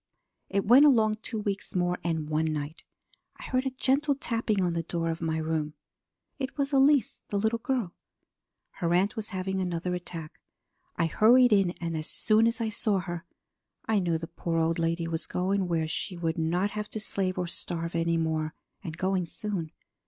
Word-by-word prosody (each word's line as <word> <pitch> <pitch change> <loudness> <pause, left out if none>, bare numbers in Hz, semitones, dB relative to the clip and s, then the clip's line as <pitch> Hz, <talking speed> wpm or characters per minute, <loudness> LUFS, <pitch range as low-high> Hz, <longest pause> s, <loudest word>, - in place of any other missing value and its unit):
"It 200 0 0
went 245 +7 +8
along 220 -7 +5
two 225 - -3
weeks 205 -2 -3
more, 180 0 +1
and 160 -3 -1
one 155 +1 +1
night 150 +1 -4 0.6
I - - -11
heard 255 +1 0
a 260 -1 -5
gentle 280 +2 +2
tapping 230 -5 -1
on 175 -1 +1
the 170 - 0
door 165 0 -2
of 165 - -5
my 160 -1 0
room. 155 -1 -2 0.6
It 265 +1 -4
was 280 0 -1
Elise, 275 -1 +4
the 205 - -2
little 220 +3 +1
girl. 235 -8 -1 0.9
Her 170 -3 0
aunt 195 +4 +2
was 220 -1 -4
having 190 -1 -2
another 180 0 -2
attack. 170 -3 -6 0.6
I 165 - +1
hurried 240 +7 +5
in, 195 -3 +3
and 165 -1 -3
as 155 0 -3
soon 220 +1 +3
as 230 +1 0
I 225 -1 0
saw 215 -2 +2
her 175 -2 -4 0.6
I 220 -2 +2
knew 170 -3 +1
the 165 - -5
poor 165 0 -3
old 165 +1 +1
lady 165 0 0
was 165 -1 -3
going 190 +1 0
where 165 -2 0
she 175 +3 -4
would 165 -1 -1
not 175 +5 +1
have 210 0 -4
to 220 - -4
slave 190 -3 -1
and 180 -1 -1
starve 170 -1 -3
any 165 0 +1
more, 160 -1 -1 0.3
and 165 -3 -6
going 185 -1 0
soon. 180 -4 -4
180 Hz, 190 wpm, -28 LUFS, 165-215 Hz, 0.9 s, went